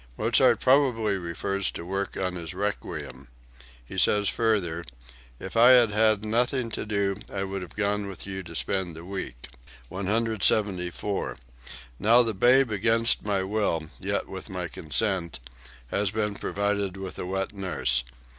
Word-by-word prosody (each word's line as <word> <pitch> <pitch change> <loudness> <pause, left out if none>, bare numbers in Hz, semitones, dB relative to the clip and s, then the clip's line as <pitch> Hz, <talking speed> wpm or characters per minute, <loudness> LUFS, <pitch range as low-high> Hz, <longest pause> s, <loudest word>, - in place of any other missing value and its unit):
Mozart - - +4
probably 125 -6 +3
refers 95 +2 -2
to 85 - -7
work 95 +2 -3
on 90 -1 -1
his 85 0 -6
"Requiem." 70 -10 -4 0.6
He - - -4
says 105 -1 +3
further: 95 -8 0 0.6
"If 95 - -7
I 120 +3 +8
had 120 -4 +6
had 110 0 +3
nothing 120 +2 +1
to - - -4
do 100 -2 0
I 95 -1 -2
would 95 0 -4
have 90 - -10
gone 105 -1 0
with 95 - -7
you 95 -1 -5
to 85 -2 -10
spend 95 -3 -1
the 85 +1 -10
week.") 90 -11 -6 0.4
174. 100 - 0 0.6
"Now 115 +3 +6
the 115 -2 -1
babe 125 +5 +4
against 115 +3 +3
my 100 -2 0
will, 95 -6 -1
yet - - -2
with - - -8
my - - -4
consent, 90 0 -2 0.5
has 100 0 +1
been 105 0 -1
provided 100 -1 -2
with 95 -1 -7
a - - -4
wet 95 +2 -2
nurse. 90 -10 +1
100 Hz, 150 wpm, -26 LUFS, 95-110 Hz, 0.6 s, I